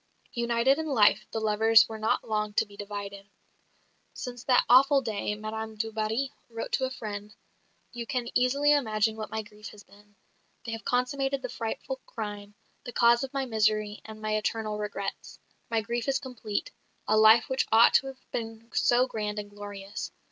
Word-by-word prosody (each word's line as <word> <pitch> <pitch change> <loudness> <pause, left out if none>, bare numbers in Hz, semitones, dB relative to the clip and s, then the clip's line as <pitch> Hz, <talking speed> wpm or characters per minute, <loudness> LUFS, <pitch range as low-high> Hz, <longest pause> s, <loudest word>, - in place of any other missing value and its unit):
United 235 +4 +2
in 320 - -3
life, 215 -7 +4
the 225 - -3
lovers 220 +1 +5
were 220 -1 -7
not 215 - 0
long 210 -1 -1
to - - +2
be 205 -1 -16
divided. 200 -1 -7 0.9
"Since 245 -2 -7
that 250 -2 +5
awful 275 +3 +6
day," 210 -2 -2
Madame 220 +1 -5
du 225 +1 -3
Barry 220 +5 -1 0.2
wrote 230 -1 -5
to 265 - +1
a - - -2
friend, 210 -4 -7 0.6
"you 235 -1 -6
can 245 -1 -2
easily 280 +4 +3
imagine 220 -5 +1
what 215 -1 -6
my 220 +1 -3
grief 210 0 -12
has 205 -1 -12
been. 205 +1 -21 0.5
They 230 - -4
have 225 0 -5
consummated 270 +2 0
the 255 - -3
frightful 235 - -4
crime, 205 - -6 0.3
the 245 - -7
cause 235 0 +4
of 270 - -5
my 275 -1 -1
misery 215 -2 0
and 220 0 -10
my 215 0 -1
eternal 215 0 -2
regrets 200 -1 -5 0.3
my 225 -1 +1
grief 235 +3 -3
is 270 0 +2
complete 240 -6 -4 0.4
a 215 - +3
life 220 +1 +7
which 260 0 0
ought 225 +1 +7
to 270 - +4
have 265 -1 -11
been 225 0 -6
so 245 +1 +4
grand 210 -4 -4
and 205 -1 -5
glorious! 205 0 -7
220 Hz, 180 wpm, -28 LUFS, 210-245 Hz, 0.9 s, life